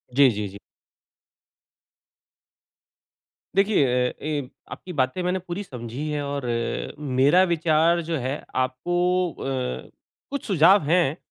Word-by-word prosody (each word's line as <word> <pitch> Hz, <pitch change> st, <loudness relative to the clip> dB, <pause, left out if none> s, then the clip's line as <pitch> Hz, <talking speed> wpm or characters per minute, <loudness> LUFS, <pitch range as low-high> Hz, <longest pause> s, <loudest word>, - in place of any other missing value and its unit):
जी, 140 Hz, -1 st, +7 dB
जी, 105 Hz, -1 st, -3 dB
जी। 100 Hz, +1 st, -10 dB, 3.0 s
देखिए 195 Hz, -6 st, +3 dB, 0.2 s
अ, -, -, -10 dB
ए 145 Hz, -4 st, -3 dB, 0.2 s
आपकी 180 Hz, -, -8 dB
बातें 130 Hz, +4 st, 0 dB
मैंने 180 Hz, +1 st, 0 dB
पूरी 180 Hz, +2 st, -5 dB
समझी 125 Hz, -, -6 dB
है। 150 Hz, -1 st, -2 dB
और 140 Hz, -2 st, -4 dB
अ, 115 Hz, -1 st, -2 dB
मेरा 145 Hz, +5 st, +4 dB
विचार 165 Hz, +1 st, +2 dB
जो 165 Hz, 0 st, -2 dB
है, 130 Hz, +2 st, -3 dB
आपको 175 Hz, +8 st, 0 dB
अ, 130 Hz, -2 st, -4 dB, 0.4 s
कुछ 280 Hz, -, -4 dB
सुझाव 190 Hz, +1 st, +5 dB
हैं, 170 Hz, -3 st, +3 dB
150 Hz, 120 wpm, -24 LUFS, 130-175 Hz, 3.0 s, जी